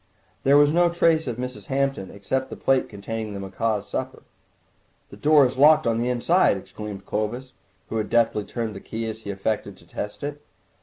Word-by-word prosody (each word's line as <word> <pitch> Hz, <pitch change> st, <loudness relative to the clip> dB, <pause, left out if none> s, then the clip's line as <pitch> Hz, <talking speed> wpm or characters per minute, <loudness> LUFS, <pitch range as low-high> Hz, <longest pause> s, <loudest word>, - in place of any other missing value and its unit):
There 140 Hz, +1 st, +5 dB
was 145 Hz, +1 st, +5 dB
no 175 Hz, +1 st, +4 dB
trace 165 Hz, -2 st, +2 dB
of 120 Hz, -2 st, -3 dB
Mrs. 125 Hz, +1 st, -6 dB
Hampton 135 Hz, -7 st, -1 dB
except 130 Hz, +7 st, -3 dB
the -, -, -6 dB
plate 135 Hz, -1 st, +1 dB
containing 105 Hz, +1 st, -5 dB
the -, -, -5 dB
macaws' 105 Hz, +2 st, -2 dB
supper. -, -, -5 dB, 0.9 s
"The -, -, -9 dB
door 150 Hz, -2 st, +5 dB
is 130 Hz, 0 st, -2 dB
locked 155 Hz, +2 st, +6 dB
on 115 Hz, -1 st, +1 dB
the 120 Hz, +1 st, 0 dB
inside!" 125 Hz, -, +3 dB
exclaimed 100 Hz, 0 st, -8 dB
Clovis, 120 Hz, +5 st, -3 dB, 0.4 s
who 115 Hz, -, -2 dB
had 110 Hz, -, -2 dB
deftly 115 Hz, -3 st, +2 dB
turned 115 Hz, -3 st, -4 dB
the -, -, -6 dB
key 115 Hz, +3 st, -5 dB
as 110 Hz, 0 st, -6 dB
he 100 Hz, -, -8 dB
affected 100 Hz, 0 st, -2 dB
to 85 Hz, -, -19 dB
test 105 Hz, +8 st, -6 dB
it. 145 Hz, 0 st, -5 dB
115 Hz, 195 wpm, -24 LUFS, 105-140 Hz, 0.9 s, locked